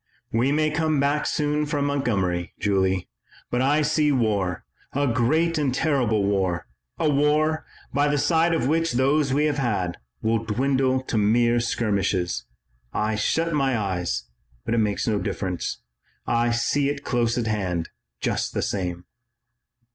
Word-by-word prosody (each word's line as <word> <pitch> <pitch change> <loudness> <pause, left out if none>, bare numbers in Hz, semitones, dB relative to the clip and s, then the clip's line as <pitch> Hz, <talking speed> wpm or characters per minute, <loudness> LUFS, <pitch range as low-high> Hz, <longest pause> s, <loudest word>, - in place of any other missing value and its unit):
We 120 +5 +2
may 155 +1 +2
come 155 -1 +1
back 145 +2 +1
soon 150 0 0
from 145 -1 0
Montgomery, 100 -11 -1
Julie, 95 -2 +1 0.4
but 125 - +1
I 145 +3 +3
see 150 0 +2
war, 105 -9 0 0.3
a 145 +1 +1
great 155 +7 +2
and 140 -3 +1
terrible 125 -7 +1
war, 95 -3 0 0.3
a - - +1
war, 150 +2 +2 0.3
by 145 +2 +3
the 145 0 +1
side 160 +4 +3
of 160 - 0
which 165 0 +1
those 135 +3 +2
we 145 +3 +2
have 150 -2 0
had, 100 -9 -1 0.3
will 115 0 +1
dwindle 130 +3 +1
to 115 -4 -1
mere 120 +3 +3
skirmishes. 100 -7 0 0.5
I 110 +1 0
shut 160 +10 0
my 135 -4 +1
eyes, 90 - -2 0.4
but - - -1
it 115 - +2
makes 105 0 0
no 105 -2 +1
difference. 90 -3 -3 0.4
I 120 0 +2
see 140 +4 +1
it 140 -1 -4
close 120 -1 0
at 120 - 0
hand, 95 -6 -1 0.3
just - - -1
the - - 0
same." 90 -2 -3
125 Hz, 155 wpm, -24 LUFS, 105-145 Hz, 0.5 s, I